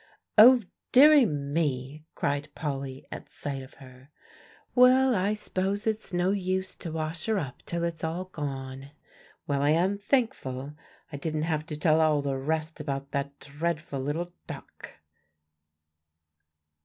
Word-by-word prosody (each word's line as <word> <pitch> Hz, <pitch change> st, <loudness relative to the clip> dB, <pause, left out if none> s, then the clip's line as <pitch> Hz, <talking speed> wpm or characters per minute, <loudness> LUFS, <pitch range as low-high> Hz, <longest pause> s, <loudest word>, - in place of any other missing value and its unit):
"Oh, 240 Hz, +2 st, +8 dB, 0.3 s
deary 285 Hz, -1 st, +8 dB
me!" 145 Hz, -1 st, -2 dB
cried 145 Hz, +1 st, -1 dB
Polly 135 Hz, -3 st, -4 dB
at -, -, -8 dB
sight 140 Hz, -2 st, -5 dB
of 130 Hz, -, -13 dB
her. 130 Hz, 0 st, -15 dB, 0.6 s
"Well, 255 Hz, +1 st, +6 dB
I 200 Hz, +1 st, +1 dB
s'pose 200 Hz, 0 st, -2 dB
it's 220 Hz, -1 st, -1 dB
no 175 Hz, +1 st, +1 dB
use 190 Hz, -1 st, -1 dB
to 165 Hz, -, -6 dB
wash 160 Hz, +3 st, -3 dB
her 220 Hz, -1 st, +2 dB
up 135 Hz, -9 st, -5 dB
till 170 Hz, 0 st, -2 dB
it's 170 Hz, -1 st, -3 dB
all 165 Hz, +3 st, -2 dB
gone. 135 Hz, -5 st, -6 dB, 0.6 s
Well, 140 Hz, -1 st, 0 dB
I 145 Hz, -, +3 dB
am 185 Hz, +6 st, +2 dB
thankful 150 Hz, -, -1 dB, 0.4 s
I 145 Hz, -, -5 dB
didn't 155 Hz, +1 st, -2 dB
have 155 Hz, -1 st, -1 dB
to 150 Hz, -, -5 dB
tell 155 Hz, +1 st, +3 dB
all 155 Hz, -2 st, +3 dB
the 140 Hz, -1 st, -1 dB
rest 155 Hz, +4 st, -2 dB
about 140 Hz, -2 st, -4 dB
that 140 Hz, 0 st, -3 dB
dreadful 155 Hz, 0 st, -3 dB
little 160 Hz, +6 st, -3 dB
duck." -, -, -10 dB
155 Hz, 145 wpm, -28 LUFS, 140-185 Hz, 0.6 s, Oh